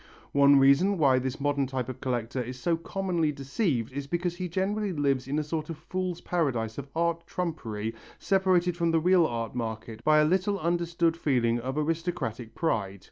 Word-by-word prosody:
One 140 0 +6
reason 140 +9 +5
why 135 -5 +4
this 130 0 -3
modern 140 -1 0
type 130 -2 -3
of 130 0 -6
collector 125 0 -2
is 125 +1 -6
so 170 +6 +1
commonly 170 -2 -1
deceived 135 - -1
is 140 0 -4
because 175 +2 -2
he 180 -1 -3
generally 195 +3 -1
lives 140 -5 0
in 145 +2 -1
a 155 - +1
sort 155 +1 -4
of 165 - -5
fool's 180 +2 -4
paradise 125 -10 -1
of 140 - -7
art 170 0 0
trumpery 115 -11 -3 0.2
separated 185 -2 +2
from 170 -1 +1
the 165 0 +3
real 175 0 +4
art 115 -1 -4
market 110 -1 -5
by 155 0 +5
a 150 - +5
little 190 +4 +1
understood 170 0 +1
feeling 120 -7 +1
of 130 +4 -4
aristocratic 150 -8 -2
pride. 100 - -1
150 Hz, 185 wpm, -28 LUFS, 130-175 Hz, 0.2 s, One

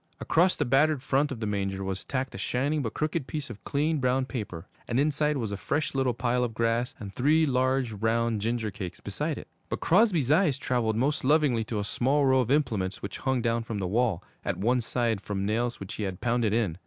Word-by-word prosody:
Across 180 +3 +3
the 145 - 0
battered 135 +2 +3
front 140 +2 +1
of 120 -4 -5
the - - -1
manger 100 -2 -2
was 95 0 -3
tacked 135 -1 -3
a - - -7
shining 140 +9 0
but 115 -5 -4
crooked 155 -2 -1
piece 150 -3 -4
of 105 - -11
clean, 150 +2 0
brown 130 0 +1
paper, 105 -11 -6 0.2
and 120 - 0
inside 150 0 +1
was 115 -5 -3
a 100 - -3
fresh 145 - -1
little 130 -3 +1
pile 125 +1 +1
of 115 -2 -3
grass 115 +2 0
and 100 -2 -7
three 155 +8 +3
large, 130 -2 +1
round 115 +1 0
ginger 115 -1 -1
cakes 95 -4 -7
beside - - -3
it. - - -9 0.2
But - - -2
Crosby's 175 - +3
eyes 155 -4 +4
traveled 120 -5 0
most 135 +6 0
lovingly 140 -5 +3
to 110 - -3
a 105 - -1
small 135 +7 +1
row 130 0 +4
of 125 -2 0
implements 115 -10 0
which 100 - -5
hung 130 -3 0
down 115 0 +1
from 115 -2 -5
the 95 - -2
wall, 105 -2 +1 0.2
at - - -2
one 120 +6 +2
side, 115 -3 0
from 100 -1 -3
nails 115 +3 -1
which 95 - -7
he - - -6
had 95 -2 -4
pounded 120 -3 +1
in. 105 -6 0
120 Hz, 225 wpm, -28 LUFS, 110-140 Hz, 0.2 s, eyes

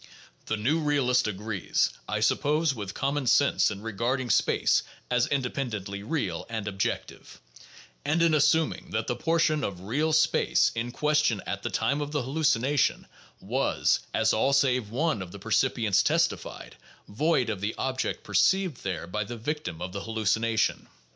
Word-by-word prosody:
The 110 - -1
new 135 +10 +1
realist 135 -6 +2
agrees, 105 -1 -1 0.2
I - - -1
suppose, 150 +1 +2
with 100 -5 -6
common 140 -1 -1
sense 140 +3 +4
in 100 -1 -7
regarding 120 +3 -1
space - - +3 0.3
as 125 0 +2
"independently 120 -7 -3
real" 100 - -3
and 110 -3 -4
"objective," 100 -1 -4 0.6
and 145 +4 +1
in 165 -1 +3
assuming 155 +2 +2
that 110 +1 -2
the 120 - -2
portion 160 -1 +1
of 90 -3 -4
real 140 +11 0
space 160 +1 +3
in 115 +1 -3
question 150 -6 +1
at - - -4
the - - -3
time 140 +2 0
of 145 - -3
the 145 -3 0
halluci 140 -2 +1
nation 140 +1 +1 0.4
was, - - +1
as - - +2
all 135 +5 +2
save 130 -5 +2
one 130 - 0
of 90 -2 -7
the 100 - -9
percipients 110 -1 +2
testified, 165 +1 -1 0.3
void 130 +1 +1
of 100 -3 -5
the 105 +2 -2
object 130 -1 -2
perceived 190 -7 +2
there 95 -4 -3
by 105 +5 -3
the 120 +3 -7
victim 115 - -4
of 90 - -5
the 100 - -4
hallucination. 110 0 0
125 Hz, 160 wpm, -27 LUFS, 105-145 Hz, 0.6 s, sense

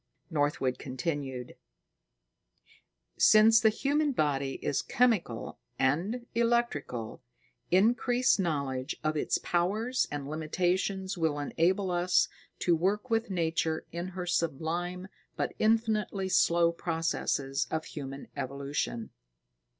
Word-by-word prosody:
Northwood 145 -4 0
continued: 130 -2 -4 1.6
Since 220 +1 +7
the 220 - +5
human 285 +6 +1
body 140 - 0
is 140 - +1
chemical 215 - 0 0.2
and 175 - 0
electrical, 230 - 0 0.5
increased 240 +5 +3
knowledge 140 -7 -1
of 155 0 0
its 150 - +1
powers 215 +9 0
and 145 -1 -5
limitations 180 +5 -1
will 160 -3 +1
enable 180 +6 +1
us 175 +1 +2 0.3
to 175 - +3
work 205 +8 -1
with 225 0 +1
Nature 165 -3 -1
in 170 +1 -4
her 185 -1 -5
sublime 175 +2 -2 0.3
but - - -2
infinitely 215 -3 +1
slow 170 -2 +4
processes 160 -4 -1
of 160 0 -2
human 135 -2 -7
evolution. 140 -3 -3
170 Hz, 105 wpm, -30 LUFS, 145-210 Hz, 1.6 s, Since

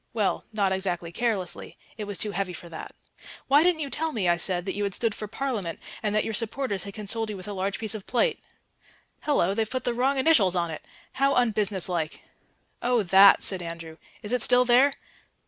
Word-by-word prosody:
Well, 215 -4 0
not 200 -3 0
exactly 180 -3 -2
carelessly; 200 -3 -2 0.2
it 215 - -5
was 205 -2 -4
too 210 - 0
heavy 195 -2 -3
for 170 - -10
that. 160 - -9 0.5
"Why 285 +2 +5
didn't 340 -1 +2
you 280 -2 -4
tell 320 +1 -1
me," 200 -6 -1
I 175 - +4
said, 175 +1 -1
"that 190 - -2
you 205 - -2
had 200 -2 -2
stood 230 -2 0
for 215 - -7
Parliament 215 -8 -3 0.2
and 210 -1 -1
that 215 - +2
your 225 - -4
supporters 220 -2 -2
had 200 - -9
consoled 220 +1 -2
you 210 - -5
with 185 - -10
a 205 - -4
large 195 +1 -2
piece 220 -1 -2
of 215 -3 -8
plate? 355 - +1 0.8
Hallo, 235 - +1
they've 220 +1 -1
put 255 0 -3
the 245 - -1
wrong 265 +3 +1
initials 260 - +4
on 170 -2 -1
it. 155 - -7 0.3
How 275 +1 +1
unbusiness 210 -6 +1
like." 170 -4 -3 0.6
"Oh, 245 -2 +2
that?" 195 +2 +7
said 190 -2 +3
Andrew. 165 -1 -8 0.3
"Is 210 +3 -3
it 250 - +2
still 250 +2 +5
there?" 250 +4 +5
210 Hz, 215 wpm, -26 LUFS, 185-245 Hz, 0.8 s, that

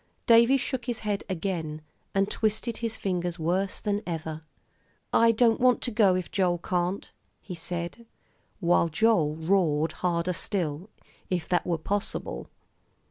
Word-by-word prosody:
Davie 235 +3 +6
shook 255 -1 -3
his 240 -3 -3
head 205 -2 -2
again, 165 -4 -3 0.3
and 195 0 +3
twisted 220 +1 0
his 230 -1 -2
fingers 175 -2 -2
worse 185 +4 0
than 205 0 -1
ever. 160 -2 -4 0.7
"I 230 0 +6
don't 230 0 +3
want 250 0 +4
to 245 - 0
go 205 -4 +4
if 185 -1 -3
Joel 180 -3 +2
can't," 180 +2 -2 0.3
he 190 - -8
said, 175 +6 -5 0.5
while 170 -2 +3
Joel 165 -3 +2
roared 160 -2 +1
harder 175 0 -1
still, 180 -2 -2 0.4
if 175 -3 -1
that 180 - +1
were 170 -2 +1
possible. 200 +5 -3
185 Hz, 140 wpm, -27 LUFS, 170-215 Hz, 0.7 s, Davie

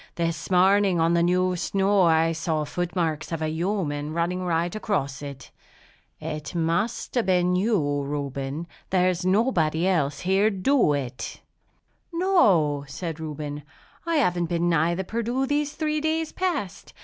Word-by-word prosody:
This 165 -1 -2
morning, 190 0 +4
on 165 +1 +3
the 170 - +3
new 180 +1 +2
snow, 195 +2 +1
I 165 -1 +4
saw 160 -1 -1
foot 175 +3 -4
marks 160 -4 -1
of 165 - -2
a 155 0 -1
human 160 -4 -2
running 170 +2 -1
right 170 0 0
across 145 -11 -2
it. 140 -2 -9 0.7
It 150 +3 -6
must 170 +7 -1
have 240 -5 0
been 180 -1 +3
you, 180 -8 +1
Reuben. 140 +1 -4 0.2
There's 180 -1 +1
nobody 185 -6 +2
else 145 -7 0
round - - -9
here 195 +3 +3
'd 195 -3 -6
do 270 - +4
it!" 130 -3 -5 0.7
"No," 200 - +3
said 160 +3 -5
Reuben, 150 -2 -5 0.4
"I 335 0 -1
haven't 180 - +2
been 170 0 0
nigh 165 +1 +2
the 190 - -2
Perdu 235 +6 -1
these 290 +1 -1
three 305 -1 -1
days 315 0 -1
past. 320 - -3
175 Hz, 155 wpm, -25 LUFS, 155-200 Hz, 0.7 s, morning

